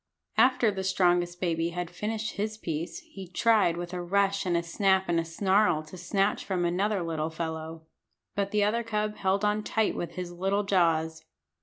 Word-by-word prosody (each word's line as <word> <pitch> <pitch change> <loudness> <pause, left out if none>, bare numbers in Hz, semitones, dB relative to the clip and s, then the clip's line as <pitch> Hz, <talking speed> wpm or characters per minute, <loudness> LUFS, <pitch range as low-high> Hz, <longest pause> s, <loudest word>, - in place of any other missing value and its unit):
After 245 -1 +4
the 190 -1 -4
strongest 175 -2 +2
baby 165 -2 0
had 175 0 -4
finished 220 +1 -3
his 215 +1 -3
piece 165 - -4
he 255 - -10
tried 195 -2 +3
with 175 +1 -5
a 180 - -3
rush 195 +2 +1
and 175 -1 +2
a 170 - -1
snap 190 +2 +2
and 170 -1 +2
a - - 0
snarl 190 0 +2
to 155 +4 -12
snatch 195 +3 0
from 185 -3 -1
another 190 +2 0
little 160 -1 -2
fellow. 160 0 -5 0.5
But 200 -1 -1
the 210 0 +2
other 220 +3 +1
cub 215 -2 -2
held 195 +1 +1
on 210 +1 +1
tight 220 0 0
with 175 - -4
his 180 -1 -5
little 195 +4 0
jaws. 165 -5 +1
185 Hz, 185 wpm, -28 LUFS, 170-210 Hz, 0.5 s, After